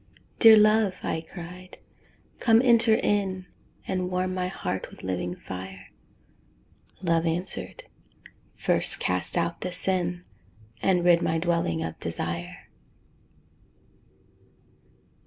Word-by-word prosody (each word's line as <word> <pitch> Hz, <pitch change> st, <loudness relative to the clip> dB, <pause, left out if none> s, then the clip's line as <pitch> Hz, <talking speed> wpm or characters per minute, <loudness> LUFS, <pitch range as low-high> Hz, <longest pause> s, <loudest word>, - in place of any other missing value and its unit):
"Dear 225 Hz, -2 st, +9 dB
love," 215 Hz, -2 st, +4 dB
I 160 Hz, -, -2 dB
cried, 180 Hz, +1 st, -10 dB, 0.6 s
"come 225 Hz, -2 st, +5 dB
enter 230 Hz, -3 st, +5 dB
in 195 Hz, -4 st, 0 dB, 0.4 s
And 185 Hz, -1 st, -2 dB
warm 185 Hz, 0 st, -1 dB
my 180 Hz, -1 st, -2 dB
heart 95 Hz, -, -4 dB
with -, -, -15 dB
living 90 Hz, -1 st, -3 dB
fire." 95 Hz, +1 st, -9 dB, 1.1 s
Love 165 Hz, -1 st, +1 dB
answered, 175 Hz, +3 st, -2 dB, 0.7 s
"First -, -, +1 dB
cast 90 Hz, -, -1 dB
out 170 Hz, 0 st, -1 dB
the 180 Hz, -, -3 dB
sin 180 Hz, -1 st, -1 dB, 0.6 s
And 180 Hz, -2 st, +2 dB
rid 175 Hz, -1 st, +5 dB
my 165 Hz, -, 0 dB
dwelling 165 Hz, -, 0 dB
of 80 Hz, 0 st, -6 dB
desire." 85 Hz, +1 st, -5 dB
180 Hz, 105 wpm, -26 LUFS, -, 1.1 s, Dear